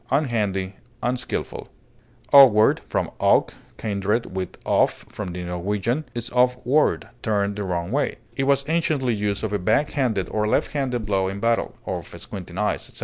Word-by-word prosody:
clownish, 140 -2 +1
maladroit, 95 -4 -1 0.3
ungainly, 125 0 -3 0.6
Awkward, 120 -6 +7
from - - -1
awk - - +3 0.2
(kindred 105 0 -1
with 95 -1 -4
off, - - +1
from 105 - -6
the 90 +1 -5
Norwegian), 100 - -2
is 120 0 -4
off 125 0 +3
ward, 145 +5 +2
turned 100 -2 0
the 105 - -3
wrong 90 -1 -2
way; 145 +3 0 0.2
it 135 - 0
was 140 0 +2
anciently 155 -6 +1
used 105 -1 -2
of 105 -2 -2
a 105 - +1
back 110 +11 +1
handed 115 - 0
or 105 0 0
left - - +1
handed 125 -6 -2
blow 95 -2 +1
in 95 +1 -4
battle, 115 +2 0
of - - -4
squinting 90 -2 -8
eyes, 105 +1 -1
etc. - - -13
110 Hz, 170 wpm, -23 LUFS, 100-125 Hz, 0.6 s, Awkward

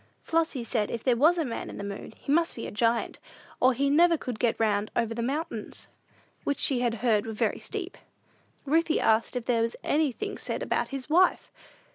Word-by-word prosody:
Flossy 320 -6 0
said 220 -3 -1
if 230 - -4
there 250 -2 +3
was 315 +8 +4
a 325 - 0
man 235 - -5
in - - -8
the - - -5
moon, 200 0 -6
he - - -4
must 330 +3 +2
be 230 - -6
a - - -6
giant, 230 +2 0 0.4
or 255 - +5
he 275 +3 0
never 335 +4 +5
could 250 -6 -5
get 235 -2 +1
round 210 -1 +1
over 230 -1 0
the 235 - -3
mountains, 280 +7 -4 0.6
which 285 - -1
she 265 -3 +2
had 240 -2 0
heard 215 -2 +2
were 225 - -4
very 215 - 0
steep. - - -6 0.7
Ruthie 320 +2 +2
asked 225 +3 +2
if 245 -2 -3
there 235 -2 +2
was 230 +1 -1
anything 310 - -1
said - - -3
about - - 0
his 275 -2 -6
wife! 355 +4 +3
250 Hz, 205 wpm, -27 LUFS, 230-305 Hz, 0.7 s, or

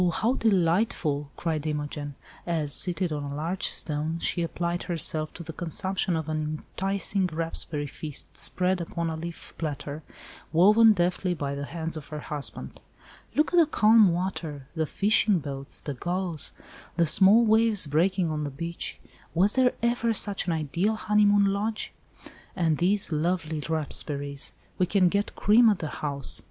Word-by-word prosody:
how 230 +8 +1
delightful," 175 - +1
cried 160 -2 -2
Imogen, 145 -1 -4 0.3
as, 155 -4 0
seated 180 -1 0
on 150 - -3
a 140 0 -5
large 165 +5 -2
stone 155 +1 -2
she 170 - -1
applied 170 +1 -2
herself 155 -2 -2
to 170 - -9
the 160 0 -8
consumption 185 +2 -1
of 160 -1 -3
an 155 0 -1 0.3
enticing 195 0 -1
raspberry 160 -2 -3
feast 150 +1 -7
spread 185 0 0
upon 170 0 -3
a - - -3
leaf 165 +1 -8
platter, 150 -1 -4 0.5
woven 210 +7 +6
deftly 180 0 0
by 140 -3 -3
the 140 0 -4
hands 165 +1 -4
of 155 - -8
her 150 0 -6
husband. 145 -1 -4 0.6
"Look 305 +3 +2
at - - +3
the 330 -3 +6
calm 215 - +5
water—the 160 -4 -3
fishing 205 +1 +2
boats, 140 -3 -3
the 145 - -5
gulls, 175 +2 -1 0.5
the 170 - +4
small 200 +8 +6
waves 220 -3 +4
breaking 170 +4 +1
on 150 -1 -2
the 145 - -3
beach! 170 +5 -6 0.4
Was 195 +5 +4
there 255 -1 +3
ever 235 -1 +1
such 200 -2 +1
an 170 - +1
ideal 170 +7 0
honeymoon 205 -1 +3
lodge? 205 +3 -2 0.6
And 160 -4 +1
these 190 +1 +3
lovely 160 0 -1
raspberries. 145 -2 -1 0.3
We 180 - +3
can 185 -1 +3
get 200 +2 -1
cream 225 +3 +5
at 205 - +2
the 155 - -4
house. 140 -3 -1
170 Hz, 155 wpm, -27 LUFS, 155-195 Hz, 0.6 s, woven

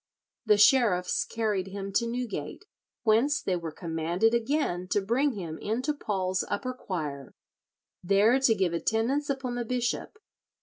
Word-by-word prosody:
The 210 -1 +5
sheriffs 205 -5 +4
carried 210 -4 -1
him 195 0 -6
to 235 +3 +1
Newgate, 235 - -4 0.4
whence 240 +6 +3
they 185 - -1
were 170 -2 -4
commanded 170 +6 0
again 235 - 0
to 205 - +1
bring 245 +8 +1
him 170 -7 -6
into 255 +8 -1
Paul's 190 -8 -1
upper 255 +5 -2
choir, 150 - -5 0.7
there 205 +7 +4
to 250 -4 +4
give 185 -4 0
attendance 230 - 0
upon 270 -3 -2
the 245 0 -2
bishop. 245 - -2
215 Hz, 140 wpm, -28 LUFS, 185-250 Hz, 0.7 s, The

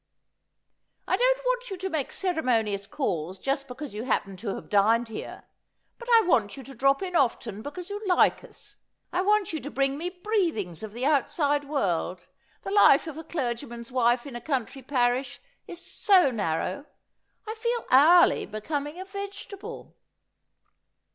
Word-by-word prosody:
' - - -50
I - - +2
don't - - +2
want - - 0
you 385 - -5
to 375 +1 -3
make 315 -7 -2
ceremonious 230 - 0
calls 185 - -3
just 275 +4 -2
because 260 +1 -7
you 215 +3 -5
happen 195 -6 -1
to 200 0 -4
have - - -9
dined 225 +3 +3
here; 220 - -7 0.6
but 475 0 -9
I 450 - +6
want 240 - +2
you 270 - -8
to 270 - -11
drop 275 +6 +2
in 360 -2 -4
often 230 - 0
because 355 - -7
you 410 +1 -4
like 360 +5 +3
us. - - -14 0.4
I 360 - +1
want 415 -2 +2
you 315 - -2
to 290 - -7
bring 275 0 0
me 350 +2 -2
breathings 355 - -2
of 215 -1 -7
the 245 +3 -3
outside 290 0 +1
world. 180 - -1 0.4
The 390 - -5
life 400 -9 +6
of 320 -3 -6
a - - -7
clergyman's 240 -5 -4
wife 240 -1 +2
in 275 -4 -8
a 240 - -6
coun 260 -3 -1
try 270 - -12
parish 250 -1 0 0.3
is 345 0 -9
so 370 -9 +4
narrow. 205 - -2 0.6
I 435 - -3
feel 470 +1 -2
hourly 325 +7 +6
becoming 290 - -4
a 375 - -6
vegetable.' 400 +2 -8
280 Hz, 170 wpm, -27 LUFS, 235-365 Hz, 0.6 s, I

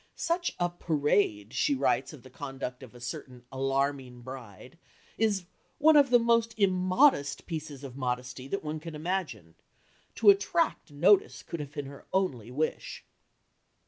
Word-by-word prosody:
"Such 345 +1 -1
a 175 - +2
parade," 145 - 0
she 285 - +2
writes - - +1
of 150 -6 -13
the 130 - -14
conduct 135 -2 -6
of 125 -2 -12
a - - -11
certain 120 +1 -7
"alarming 135 -1 -1
bride," 130 - -10 0.4
is 205 -5 +1 0.3
"one 315 +1 +6
of 285 -2 +6
the 245 - +7
most 230 -1 +2
immodest 185 - +3
pieces 155 -4 -6
of 130 -3 -8
modesty 125 0 -3
that 195 +6 -3
one 155 0 -4
can 165 0 -8
imagine. 150 - -3 0.6
To 210 -3 +8
attract 200 - 0
notice 180 +7 +3
could 170 - -6
have 145 -1 -7
been 145 -2 -4
her 140 +1 -11
only 135 - -1
wish." 150 +5 -3
150 Hz, 150 wpm, -29 LUFS, 130-195 Hz, 0.6 s, To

